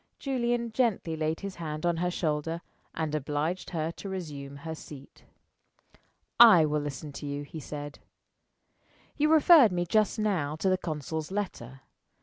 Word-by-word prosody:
Julian 240 -3 -1
gently 220 -9 0
laid 155 0 -2
his 200 -2 -6
hand 155 -1 -5
on 170 -1 +1
her 180 +1 0
shoulder 165 -1 -2 0.3
and 160 -2 -2
obliged 155 +4 -2
her 160 -1 -2
to 195 - -8
resume 145 -7 -6
her 160 +3 -6
seat. 145 -3 -12 1.1
"I 215 -9 +9
will 150 0 0
listen 145 +1 -6
to 140 +1 -7
you," 145 0 -4
he 150 +2 -8
said. 145 0 -7 1.2
"You 300 +1 +2
referred 310 - +7
me 175 -1 -1
just 215 +3 +2
now 185 -9 0
to 190 +4 0
the 185 - +3
consul's 155 -1 -4
letter. 135 - -5
160 Hz, 150 wpm, -28 LUFS, 150-195 Hz, 1.2 s, I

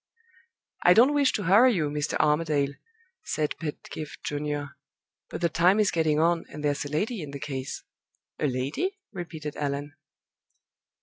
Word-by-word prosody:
"I 180 - +7
don't 255 +6 +6
wish 285 -2 +3
to 205 - -1
hurry 215 +8 +6
you, 155 -5 0
Mr. 150 0 -1
Armadale," 150 -2 +2 0.5
said 155 - -1
Pedgift 155 -1 -7
Junior; 145 -1 -3 0.6
"but - - -6
the 170 - +4
time 180 +6 +4
is 210 -2 +3
getting 155 -2 +2
on, 165 +1 +2
and 150 0 -8
there's 145 0 0
a - - -5
lady 205 - -1
in 150 - -6
the 140 0 -7
case." 135 -2 -5 0.6
"A 150 - +1
lady?" 140 - -2
repeated 160 -5 -6
Allan. 145 0 -3
150 Hz, 150 wpm, -27 LUFS, 145-180 Hz, 0.6 s, I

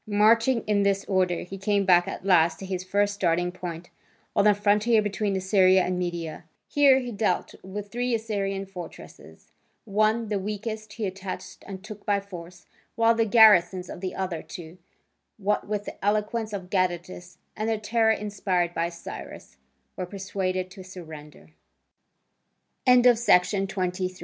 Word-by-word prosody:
Marching 225 +3 +3
in 210 -1 +1
this 200 0 +1
order, 185 -3 +1
he 195 +2 -8
came 200 0 +1
back 175 -2 +5
at - - -6
last 170 -3 +4
to 195 - -8
his 185 -1 -4
first 205 +2 +1
starting 175 -2 0
point, 175 -1 -7 0.4
on 200 - +3
the 210 -1 +6
frontier 210 +3 +3
between 205 -1 -1
Assyria 190 -1 +4
and 180 0 -2
Media. 170 -3 -4 0.2
Here 280 -2 +5
he 250 -2 -3
dealt 205 -4 -1
with 200 +2 -7
three 245 0 0
Assyrian 200 -3 -3
fortresses: 180 -4 -12 0.3
one, 215 +2 +1
the 205 -2 0
weakest, 215 +2 -5
he 225 - -3
attacked 190 -1 -7
and 190 -1 -8
took 210 -1 -10
by 205 -1 +1
force, 175 -3 -11 0.3
while 230 0 +4
the 225 0 +1
garrisons 195 -5 +5
of - - -9
the 185 -1 -4
other 180 -4 -3
two, 170 +1 -10 0.6
what 210 0 -1
with 205 0 -3
the - - -9
eloquence 215 +2 0
of 190 -3 -6
Gadatas 180 -1 -2 0.2
and 215 +1 -2
the 225 - +1
terror 220 +1 +1
inspired 195 -5 0
by 170 0 -1
Cy 170 -1 -9
200 Hz, 140 wpm, -26 LUFS, 180-215 Hz, 0.6 s, the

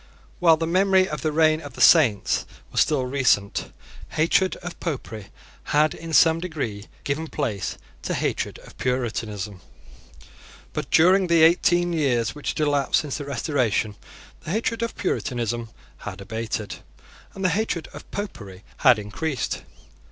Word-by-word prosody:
While 165 -3 +5
the 165 - -1
memory 190 +2 +3
of 150 -6 -5
the 155 - 0
reign 155 0 +3
of - - -9
the - - -12
Saints 130 - +4 0.2
was - - +2
still 145 -5 +2
recent, 125 -7 +1 0.4
hatred 170 +4 +2
of 175 -1 -7
Popery 115 - -5 0.4
had 150 +1 +2
in 165 0 -8
some 160 +1 +5
degree 140 - -4 0.2
given 150 +3 -2
place 100 - -3 0.2
to - - -2
hatred - - -2
of - - -15
Puritanism; 110 -6 -2 1.1
but, - - -4
during 185 +3 +5
the 170 -2 +5
eighteen 175 +1 +4
years 125 -8 +1
which 150 - -5
had - - -1
elapsed 145 -2 +2
since 145 -3 -4
the 145 - -5
Restoration, 125 - 0 0.4
the - - -10
hatred 225 +4 -1
of 230 -1 -2
Puritanism 120 - -2 0.3
had - - -8
abated, 110 -2 -4 0.6
and 195 -1 -3
the - - +5
hatred 180 -2 -1
of - - -11
Popery 105 - -7
had 130 -5 +6
increased. 125 +7 -3
150 Hz, 145 wpm, -24 LUFS, 115-170 Hz, 1.1 s, had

